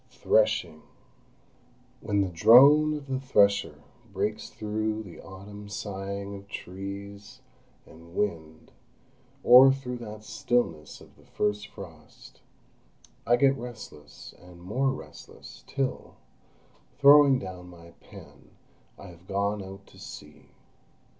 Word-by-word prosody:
THRESHING 80 0 0 1.2
When 100 -1 0
the 95 - -1
drone 140 - +6
of 145 -2 -7
the 135 -1 -3
thresher 100 - +1 0.3
breaks 105 +2 -3
through 110 +1 -3
the 90 -6 -12
autumn 100 +2 -11
sighing 100 -1 -6
of 100 0 -12
trees 100 +2 -9 0.4
and 85 +2 -16
wind, 80 -6 -4 0.7
or 130 +2 +8
through 130 -2 -5
that 110 -2 -9
stillness 95 -10 -2
of - - -18
the - - -22
first 105 0 -2
frost, - - -14 0.9
I 120 - +5
get 135 +2 +3
restless 115 - -11
and 90 -1 -15
more 115 +10 -1
restless, 135 - -12
till, 135 -2 -4 0.8
throwing 140 -1 +7
down 90 -4 -9
my 85 -1 -15
pen, - - -16 0.5
I 100 - -12
have 85 +1 -17
gone 100 +1 -1
out 95 +1 -11
to - - -19
see. 75 0 -12
100 Hz, 115 wpm, -27 LUFS, 95-120 Hz, 1.2 s, or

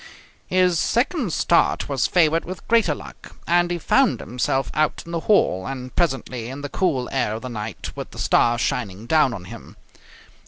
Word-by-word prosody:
His 180 -2 +2
second 245 - 0
start 170 - +2
was 140 -2 0
favoured 165 -2 +3
with 185 +1 -8
greater 230 -1 +3
luck, - - -12
and 175 0 +2
he 175 - -1
found 260 +7 +2
himself 125 +2 -1
out 155 +1 0
in 170 - -9
the 170 - -1
hall, 160 - +2
and 130 -1 -6
presently 130 -8 -1
in 135 +2 -7
the 145 - -5
cool 140 -8 0
air 125 -5 0
of 115 - -7
the 130 - -5
night, 110 -2 -6
with - - -6
the - - -14
stars 120 0 +2
shining 105 -4 -2
down 150 +1 +3
on 95 -6 -7
him. - - -11
145 Hz, 185 wpm, -22 LUFS, 125-175 Hz, -, favoured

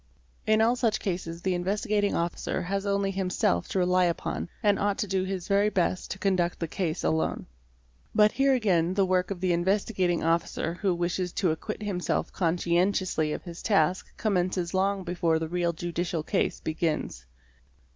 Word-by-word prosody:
In 215 0 +4
all 235 +2 +3
such 230 -4 +1
cases 175 -3 -4
the 190 - +1
Investigating 205 +3 0
Officer 170 +1 -2
has 195 +3 -2
only 200 0 +1
him 190 -1 -2
self 85 - +1
to - - -3
rely 180 0 +3
upon, 170 0 -2
and 205 -2 +3
ought 205 0 +1
to 210 - -1
do 190 0 0
his 190 -2 -4
very 200 +1 +3
best 185 -2 0
to - - -4
conduct 185 -3 +1
thé 165 - -3
case 170 -5 -2
alone. 160 0 0 0.7
But 210 0 +6
here 270 0 +3
again 185 -7 +1
the 195 -1 +3
work 185 -1 +1
of 190 -3 -5
the 185 -2 +2
Investigating 185 0 +1
Officer 165 0 0
who 185 0 0
wishes 175 +1 -1
to 185 -6 +1
acquit 215 +7 -5
himself 190 -4 -2
conscientiously 175 -1 +1
of - - -4
his 170 -2 -8
task 185 -3 +1
commences 180 -4 0
long 195 +1 +1
before 170 -2 +1
the 160 0 -3
real 175 +1 0
judicial 170 -1 -3
case - - 0
begins. 155 - -2
185 Hz, 175 wpm, -27 LUFS, 170-200 Hz, 0.7 s, But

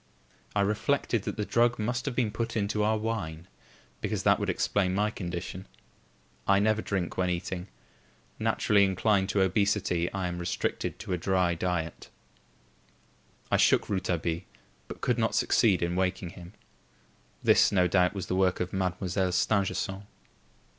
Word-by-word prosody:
I 100 - +3
reflected 105 +2 0
that - - -4
the 105 - -1
drug 120 +2 +2
must 120 +4 -2
have 135 - -2
been 120 -4 +1
put 115 +1 -3
into 105 0 0
our 110 +1 +2
wine; 95 -7 -4 0.5
because - - -2
that - - +4
would - - -2
explain 95 -2 +1
my 105 +2 +1
condition. 90 0 -6 0.8
I 100 - +5
never 110 +2 +2
drink 95 -5 -3
when 90 -1 +1
eating. 90 +1 -3 0.7
Naturally 100 -1 +3
inclined 95 +1 +2
to 95 0 +2
obesity, 95 -3 +1
I 95 -2 -2
am 90 0 -4
restricted 85 0 -2
to 95 - -5
a 90 - -1
dry 90 -1 +1
diet. 85 -1 -3 1.4
I - - +4
shook - - +3
Rouletabille, 85 -4 -1 0.5
but - - -9
could 125 -1 +1
not 110 - +1
succeed 100 -7 +3
in 85 +1 -1
waking 95 -1 -1
him. 90 +2 -12 0.9
This, - - +5
no 90 -3 +3
doubt, 90 +2 +2
was 95 - -3
the 90 - -2
work 95 -1 +2
of 90 - -3
Mademoiselle 95 0 -1
Stangerson. 95 +1 0
95 Hz, 155 wpm, -28 LUFS, 90-105 Hz, 1.4 s, I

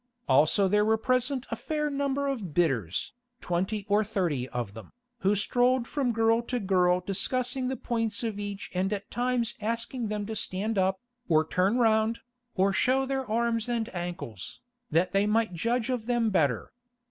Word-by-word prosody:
Also 155 +8 +4
there 210 +2 +3
were 220 +1 +3
present 255 +3 0
a - - 0
fair 300 -1 -2
number 280 -1 -1
of 225 - -3
bidders, 135 - 0 0.3
twenty 190 +4 -2
or 205 +1 +3
thirty 170 - -1
of 120 -5 -4
them, 110 0 -11 0.3
who 205 -1 +2
strolled 245 +4 +2
from 270 -4 0
girl 225 0 +3
to 245 +1 -3
girl 180 -3 +2
discussing 250 +7 0
the 265 - -1
points 225 -2 -2
of 220 -3 -2
each 205 -1 -5
and 185 +2 0
at 205 -1 -4
times 245 -1 0
asking 230 +2 -2
them 210 -1 -3
to 220 +1 -5
stand 210 +2 -2
up, 190 0 +1 0.3
or 155 -1 +4
turn 190 +8 +2
round, 225 -1 +2 0.3
or 195 +1 +3
show 260 +6 +2
their 265 -3 -2
arms 230 +1 0
and 235 -1 -2
ankles, 175 - -6 0.3
that 175 +3 +2
they 195 +1 +2
might 220 -2 +1
judge 230 +7 0
of 240 -3 -3
them 240 -3 +1
better. 145 - +1
220 Hz, 170 wpm, -28 LUFS, 185-245 Hz, 0.3 s, Also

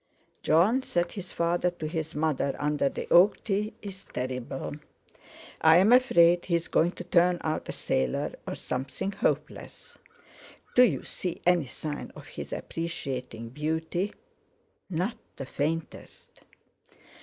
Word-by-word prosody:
"Jon," 190 +12 +4
said 175 -8 -1
his 195 -3 -7
father 170 +1 +1
to 175 -3 -6
his 160 -1 -4
mother, 150 -3 0
under 145 -1 +1
the - - -6
oak 180 +4 +6
tree, 210 +1 -1
"is 195 -2 -8
terrible. 130 +3 -4 0.8
I'm 175 +8 +7
afraid 175 -9 +5
he's 170 -2 0
going 170 +3 +2
to - - -7
turn 175 0 +3
out 155 -1 -2
a - - 0
sailor, 65 -1 -1
or - - -3
something 135 +10 -3
hopeless. - - -3 0.7
Do 250 - +6
you 185 - +4
see 180 -2 -4
any 175 -5 +3
sign 145 +4 -6
of - - -11
his - - -7
appreciating 130 -8 -4
beauty?" 160 - -2 0.7
"Not 185 +6 -1 0.2
the 135 - -6
faintest." 155 +5 -4
165 Hz, 130 wpm, -28 LUFS, 145-180 Hz, 0.8 s, I'm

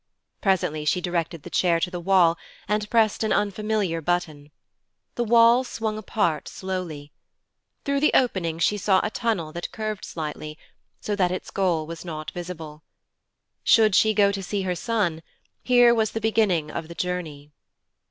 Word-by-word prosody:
Presently 170 -6 +1
she 150 +4 +1
directed 170 -3 -3
the - - -10
chair 170 -2 +2
to 180 - -2
the 175 - -4
wall, 175 -2 +4 0.3
and 210 +1 -1
pressed 225 -2 +2
an 220 - 0
unfamiliar 205 -4 0
button. 155 -3 -2 0.6
The 240 - -1
wall 235 +2 +5
swung 225 -3 -3
apart 200 -7 -1
slowly. 175 -6 -5 0.7
Through 280 0 +1
the 300 - +4
opening 180 -10 +1
she 205 +5 +1
saw 190 -1 +3
a 215 - -2
tunnel 215 -11 -1
that 170 +2 -6
curved 215 -2 -4
slightly, 155 -1 -6 0.4
so 210 - -2
that 180 -3 +2
its 185 +1 -5
goal 175 -5 0
was 165 +1 -8
not 155 -3 -6
visible. 165 -4 -8 0.8
Should 220 -3 +5
she 215 +3 +4
go 200 -1 +4
to 200 -1 -4
see 195 +1 -3
her 185 -1 -1
son, 180 -3 -1 0.4
here 245 -1 +5
was 220 -2 0
the 225 - -2
beginning 210 -8 +1
of 160 - -5
the 170 - -10
journey. 160 -6 -4
185 Hz, 160 wpm, -24 LUFS, 165-215 Hz, 0.8 s, wall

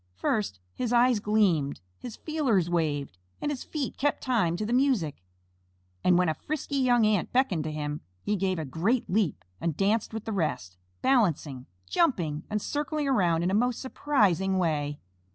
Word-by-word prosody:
First, 95 - -1
his 245 -2 -2
eyes 245 -1 +4
gleamed, 200 -9 +1 0.2
his 245 -3 -7
feelers 245 - 0
waved, 145 - -1 0.2
and 295 - -1
his 275 - -4
feet 295 -4 -4
kept 290 +1 0
time 205 -10 +1
to 215 - -2
the 230 - -1
music, 245 - +1 0.8
and, 180 -1 +5
when 180 0 +3
a 160 - +2
frisky 285 - -4
young 245 -4 +4
Ant 210 -4 +1
beckoned 245 - +2
to 155 - -2
him, 150 -1 -4 0.2
he 210 - 0
gave 190 -1 0
a 160 - -3
great 190 - 0
leap 180 - 0
and 165 -3 -2
danced 205 +3 +1
with 220 -1 -6
the 220 - -3
rest, 120 - -2 0.3
balancing, 165 - +1 0.2
jumping, 165 - +1
and 210 -1 -2
circling 295 0 -2
around 175 -10 +2
in 180 - +1
a - - -1
most 245 +3 +1
surprising 200 - +1
way. 150 -5 0
200 Hz, 170 wpm, -28 LUFS, 160-250 Hz, 0.8 s, and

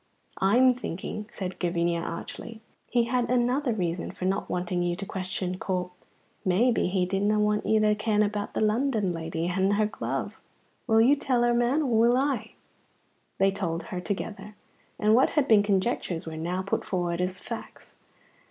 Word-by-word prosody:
"I'm 245 +7 +5
thinking," 210 -2 -5
said 185 -1 -5
Gavinia, 170 -1 0
archly, 220 +6 -7 0.3
"he 240 -1 +3
had 240 0 0
another 250 +2 +1
reason 175 -5 -2
for 185 - -6
no 195 +2 0
wanting 180 0 -2
you 175 0 0
to 195 +2 -6
question 185 -1 -4
Corp. 180 -1 -2 0.5
Maybe 220 +6 +2
he 180 0 +1
didna 200 +3 +1
want 210 0 +1
you 220 - +4
to 210 0 +4
ken 215 0 +1
about 205 0 -3
the - - 0
London 215 -2 +1
lady 165 0 -3
and 190 +2 +1
her 210 +1 +2
glove. 215 - -4 0.5
Will 225 -1 +5
you 265 +5 +6
tell 255 -4 +1
her, 240 0 +3
man, 240 +6 +2
or 240 -5 +2
will 240 +2 +5
I?" 260 -5 -1 0.8
They 195 0 +3
told 175 -4 -3
her 180 - -5
together, 205 +3 -5 0.4
and 215 +1 +3
what 250 +4 +5
had 295 -3 +1
been 215 -2 +6
conjectures 195 -4 0
were 160 -1 -6
now 175 +4 -2
put 195 - -1
forward 175 -2 -1
as 185 +1 -1
facts. - - -8
205 Hz, 170 wpm, -27 LUFS, 180-235 Hz, 0.8 s, you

